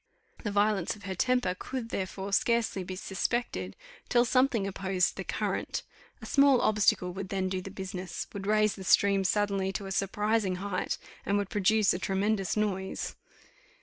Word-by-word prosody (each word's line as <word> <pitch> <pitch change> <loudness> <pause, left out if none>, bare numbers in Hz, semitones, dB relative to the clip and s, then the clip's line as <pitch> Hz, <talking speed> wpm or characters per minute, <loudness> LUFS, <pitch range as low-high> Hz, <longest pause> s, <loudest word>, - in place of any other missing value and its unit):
The 210 - -1
violence 205 -2 +1
of 205 - -16
her 190 0 -3
temper 250 -1 +1
could, 250 -3 -5
therefore, 195 0 -4
scarcely 230 -3 +2
be 185 +1 -6
suspected, 190 - -2 0.3
till 240 0 +4
something 255 -4 +2
opposed 190 -1 0
the - - -4
current: - - -2 0.4
a - - -5
small 275 -2 +5
obstacle 205 -4 +2
would 190 0 -5
then 190 -1 -1
do 185 0 -2
the 195 - -7
business 185 -2 -5
would 195 -1 -5
raise 215 0 +3
the 190 - -9
stream 195 +1 +4
suddenly 195 -1 +1
to 200 - -4
a 195 - -6
surprising 205 0 +1
height, 195 0 -2 0.3
and 200 - +1
would 200 -1 -2
produce 210 +1 +3
a 180 - -3
tremendous 195 +1 0
noise. 190 -3 -2
195 Hz, 165 wpm, -29 LUFS, 190-215 Hz, 0.4 s, small